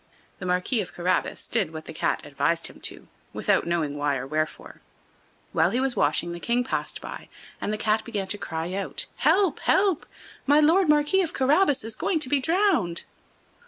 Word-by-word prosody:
The 180 - -5
Marquis 180 +6 +1
of 175 - -8
Carabas 180 +1 -1
did - - 0
what 160 -1 -8
the - - -8
Cat - - -1
advised - - 0
him - - -6
to, - - -5 0.3
without - - +1
knowing 160 -4 0
why 145 -1 0
or 130 - -5
wherefore. 155 +3 -3 0.7
While - - +3
he 245 - 0
was 265 -1 0
washing 155 +4 +1
the 170 - -6
King 240 +6 +1
passed 255 - -3
by, - - -8 0.3
and - - -1
the 215 - -1
Cat 215 0 +1
began 210 -4 -3
to 205 - -2
cry 165 +2 -4
out: 195 0 -2
"Help! 365 +7 +3
help! 380 -5 +2 0.4
My 290 +2 +6
Lord 330 +3 +4
Marquis 300 +5 +4
of 335 - -2
Carabas 280 - +3
is 225 0 -4
going 360 - 0
to 255 - -1
be 285 - +3
drowned." 320 - +2
225 Hz, 190 wpm, -25 LUFS, -, 0.7 s, My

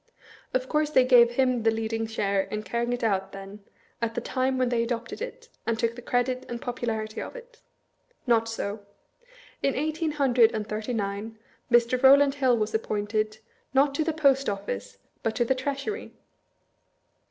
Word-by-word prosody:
Of 255 0 -1
course 300 +1 +1
they 260 -4 +5
gave 240 -2 +6
him 255 -1 +2
the 225 - +3
leading 225 0 -2
share 200 -3 0
in 215 +2 -5
carrying 235 +1 -2
it 245 -1 -2
out, 195 -3 0
then, 195 +1 -9 0.4
at 230 -1 -1
the - - 0
time 260 +2 0
when 255 -1 +1
they 240 -1 +1
adopted 235 - -3
it, - - -7 0.2
and 230 -1 +1
took 230 0 0
the 245 - -9
credit 250 +1 0
and 240 0 -4
popularity 230 -4 -3
of - - -7
it? 485 -1 -13 0.6
Not 230 -2 +2
so. 215 -2 -3 0.8
In 275 - +1
eighteen 310 +2 -1
hundred 250 -6 +4
and 215 -1 -2
thirty 215 +3 -3
nine, 205 +2 -3 0.3
Mr. 240 +1 +4
Row 270 +1 +9
land 280 -1 +3
HOI 260 -3 +3
was 215 -1 -1
appointed 215 0 -1 0.2
— - - -40
not 275 +1 +4
to 315 - 0
the 325 - 0
Post 275 -3 +3
Office, 100 - -5 0.2
but 225 - -1
to 240 - +2
the 265 - +2
Treasury. 280 - -4
240 Hz, 180 wpm, -27 LUFS, 220-265 Hz, 0.8 s, Row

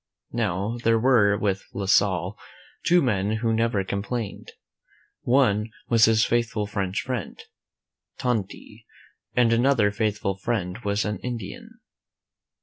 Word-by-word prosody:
Now, 105 0 -1
there 115 0 +4
were 110 -4 +4
with 100 -2 -1
La 100 - -2
Salle 95 -1 +2 0.5
two 175 -1 +4
men 105 -4 0
who 115 +1 0
never 110 -3 +1
complained. 100 +3 -4 0.7
One 115 -4 +2 0.2
was 115 -2 +6
his 110 0 +3
faithful 115 -3 0
French 100 -2 -2
friend, 125 -7 -4 0.8
Tonti, 110 -1 -4 0.5
and 120 -2 +4
another 115 -3 +3
faithful 105 -2 -1
friend 95 -2 -2
was 105 -2 -1
an 105 0 -2
I - - -21
Indian. 115 -6 -7
110 Hz, 125 wpm, -25 LUFS, 100-120 Hz, 0.8 s, was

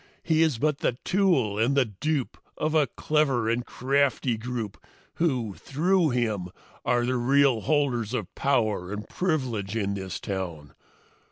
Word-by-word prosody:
He 160 -1 +2
is 160 -7 +3
but 150 +3 0
the 120 - 0
tool 155 - +2
and 130 +5 +2
the 135 - +5
dupe 130 +7 -2 0.2
of 155 0 -1
a 155 -3 +4
clever 135 -4 +1
and 120 +2 +1
crafty 135 -1 +1
group 115 -3 -5 0.3
who, 130 - 0
through 165 - +1
him, 110 -7 -1 0.4
are 120 0 +2
the 130 +1 0
real 135 -1 +3
holders 125 -6 +1
of 105 -5 -4
power 110 -9 0
and 105 +1 -5
privilege 125 - -1
in 100 -3 0
this 95 -3 -5
town. 90 -8 -5
125 Hz, 150 wpm, -26 LUFS, 105-145 Hz, 0.4 s, the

